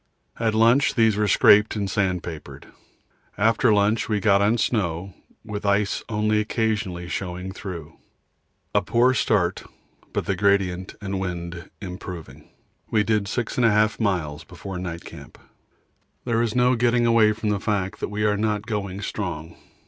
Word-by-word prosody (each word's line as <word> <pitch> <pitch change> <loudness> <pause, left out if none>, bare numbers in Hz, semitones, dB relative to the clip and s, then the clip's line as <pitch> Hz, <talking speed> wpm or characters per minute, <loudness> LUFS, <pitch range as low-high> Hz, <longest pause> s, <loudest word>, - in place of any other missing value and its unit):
At 110 -2 +1
lunch 115 +5 +4
these 110 -3 +4
were 105 0 +1
scraped 105 +2 +5
and 100 -2 -1
sand 95 -2 0
papered. 80 -3 -8 0.7
After 110 +2 +3
lunch 105 +2 +2
we 105 -1 +1
got 100 0 +3
on 105 +4 +3
snow, 95 -5 -1 0.3
with 105 -2 -5
ice 100 0 +1
only 105 0 +1
occasionally 105 -5 -1
showing 90 +1 -4
through. 85 -6 -8 0.8
A - - +3
poor 125 +2 +3
start, 95 -7 +1 0.5
but - - -2
the 100 - 0
gradient 95 -2 +1
and 95 -2 -3
wind 85 -1 -5
improving, 90 -3 -8 0.4
we 105 -2 +2
did 105 -1 0
6 115 +2 -3
1/2 110 -3 +3
miles 85 -8 -1
before 90 +3 -8
night 85 -2 -6
camp. - - -11 0.9
There 115 -2 +1
is 115 -1 -1
no 125 0 +4
getting 120 0 +2
away 115 -2 +5
from 105 0 -3
the 105 -1 0
fact 100 -1 -2
that - - -3
we 105 0 -2
are 105 -1 +2
not 105 0 -1
going 100 -3 -4
strong. 85 -6 -5
105 Hz, 155 wpm, -24 LUFS, 95-110 Hz, 0.9 s, scraped